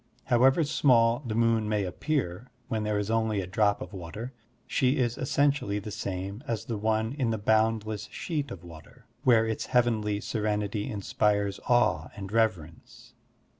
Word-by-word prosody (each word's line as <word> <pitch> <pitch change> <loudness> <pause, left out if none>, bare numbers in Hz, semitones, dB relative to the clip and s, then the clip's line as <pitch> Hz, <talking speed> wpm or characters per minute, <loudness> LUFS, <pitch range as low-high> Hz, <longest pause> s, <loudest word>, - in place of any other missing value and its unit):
However 130 +6 +4
small 120 -6 +3
the 110 - -2
moon 115 -2 +2
may 105 -2 +1
appear 95 - -2 0.2
when 110 -1 -1
there 105 -1 0
is 105 +1 -2
only 110 -2 +1
a 95 - -2
drop 100 +2 +1
of - - -11
water, 100 +8 -7 0.3
she 130 +2 +1
is 120 -3 +1
essentially 140 -6 +1
the 105 +1 -6
same 100 +4 -5
as 115 -1 -2
the 115 - -3
one 110 +2 0
in 135 -5 -1
the 110 - 0
botmdless 110 0 +1
sheet 150 -5 -3
of 90 -7 -9
water, 80 -3 -14 0.2
where 115 -5 +5
its 110 -1 -3
heavenly 110 -5 +1
serenity 105 -1 -2
inspires 100 -1 0
awe 120 0 +3
and 100 -1 -7
reverence. 105 -8 -2
110 Hz, 160 wpm, -28 LUFS, 100-120 Hz, 0.3 s, where